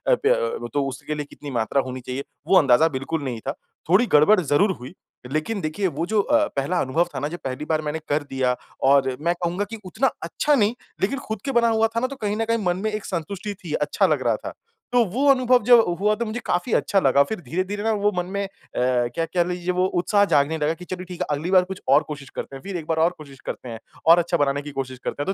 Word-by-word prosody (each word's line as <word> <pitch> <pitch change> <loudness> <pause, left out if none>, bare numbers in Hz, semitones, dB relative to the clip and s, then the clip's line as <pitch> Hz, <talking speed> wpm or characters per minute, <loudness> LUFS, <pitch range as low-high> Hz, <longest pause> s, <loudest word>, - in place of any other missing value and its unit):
प 430 - -2
अ, 470 -1 +2
व - - -3
तो 145 -1 +1
उसके 135 +3 -5
लिए 150 - -4
कितनी 145 -2 -9
मात्रा 120 +3 +1
होनी 130 0 -6
चाहिए?" 130 +3 -5 0.2
वो 190 - +6
अंदाज़ा 140 +2 +5
बिल्कुल 145 +3 -3
नहीं 120 -4 -3
था। 135 - +1 0.4
थोड़ी 205 +7 +5
गड़बड़ 180 +7 +6
ज़रूर 170 +6 +2
हुई। 125 +8 -9 0.4
लेकिन 185 +7 -1
देखिए 155 +6 -1
वो 165 +1 -2
जो 210 +1 +2
अ, 295 +6 +2
पहला 145 +6 0
अनुभव 160 +6 +1
था - - -1
ना 145 - -1
जो 175 +3 -6
पहली 130 +3 -4
बार 155 -1 0
मैंने 155 +1 -3
कर 145 0 +1
दिया 130 -2 0 0.3
और 135 -2 +4
मैं 170 +2 +1
कहूँगा 175 +4 0
कि 225 - -6
उतना 240 +8 +1
अच्छा 290 - +1
नहीं 215 -1 +2 0.3
लेकिन 260 +8 0
खुद 220 -6 -6
के 270 - -1
बना 235 -2 +3
हुआ 225 0 +3
था - - +2
ना 255 - 0
तो 275 - -7
कहीं 205 0 -1
न 225 - 0
कहीं 230 0 +1
मन 175 0 +1
में 220 - 0
एक 215 -1 -4
संतुष्टि 195 +4 -4
थी 155 -3 -5
अच्छा 150 0 +1
लग - - +1
रहा - - +3
था। - - -7 0.4
तो 245 - +5
वो 260 +9 0
अनुभव 255 -2 +4
जब 240 0 +7 0.2
हुआ 210 +1 +3
तो 235 - -2
मुझे 220 +2 -4
काफ़ी 180 +6 0
अच्छा 195 - +2
लगा। 140 -3 +4
फ़िर 220 +2 -5
धीरे, 180 +2 -2
धीरे 205 +2 -5
ना 225 - +2
वो 205 0 +1
मन 180 - 0
में 200 +2 -3
अ, - - -9 0.3
क्या 125 +4 +1
कह 175 +1 +1
लीजिए 180 0 -2
वो 180 +1 +2 0.2
उत्साह 205 +2 +3
जागने 145 +3 +3
लगा 150 +1 +1
कि 180 +2 -11
चलो 185 0 -5
ठीक 180 0 -9
है - - -1
अगली 165 +6 -4
बार 185 -1 +6
कुछ 190 0 -8
और 140 +3 +6
कोशिश 140 -3 -7
करते 135 - -5
हैं। 135 - -10
फ़िर 195 -2 -4
एक 160 - -7
बार 160 - 0
और 175 - +2
कोशिश 140 -3 -13
करते 125 - -6
हैं 115 -1 -7 0.3
और 165 +2 +7
अच्छा 170 0 0
बनाने 140 0 +1
की 145 0 -8
कोशिश 130 -2 -5
करते 145 - -3
हैं। 195 - -1
175 Hz, 265 wpm, -23 LUFS, 145-210 Hz, 0.4 s, जब